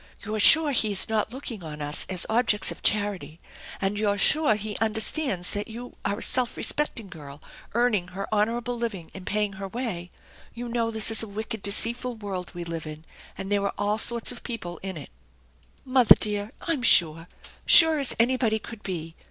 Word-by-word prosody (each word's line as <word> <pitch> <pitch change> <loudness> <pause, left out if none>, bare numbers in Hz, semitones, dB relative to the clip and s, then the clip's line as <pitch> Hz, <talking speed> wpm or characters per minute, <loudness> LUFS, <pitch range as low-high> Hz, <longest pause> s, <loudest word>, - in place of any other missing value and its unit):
" - - -30
You're 215 +1 -4
sure 315 +7 +7
he 220 -5 0
is 190 - +1
not 220 0 -1
looking 240 -6 -8
on 150 -2 -9
us 145 0 -1
as 185 -2 +1
objects 220 -3 +1
of - - -10
charity, 195 -7 -1 0.4
and 195 +1 -2
you're 205 -1 0
sure 300 +2 +3
he 210 0 -6
understands 220 - -1
that 205 0 -5
you 240 +2 -10
are 200 +1 -2
a - - -9
self 250 -2 0
respecting 265 -8 -3
girl 145 -6 -12 0.4
earning 230 -7 0
her 190 +2 -7
honorable 230 +3 -1
living 225 -8 -6
and 190 -1 -11
paying 210 -1 -2
her 195 0 -8
way? 190 -6 -5 0.5
You 240 0 -7
know 230 -1 -2
this 220 0 +1
is 225 - +3
a 225 - -1
wicked, 220 +1 -7
deceitful 235 +5 -1
world 195 -4 -7
we 175 - -6
live 165 -2 -7
in, 155 +1 -10 0.3
and 195 - -7
there 205 -1 +1
are 200 - -3
all 205 +1 -1
sorts 235 +1 0
of 245 - -11
people 175 -8 -8
in 190 -1 -7
it/' 150 - -10 0.7
"Mother 255 -2 +5
dear! 210 0 -1
I'm 330 -6 -2
sure. 165 -8 +5 0.4
Sure 320 -2 +10
as 275 - +1
anybody 235 -2 +2
could 220 0 -11
be. 165 -5 -6
210 Hz, 195 wpm, -24 LUFS, 190-235 Hz, 0.7 s, Sure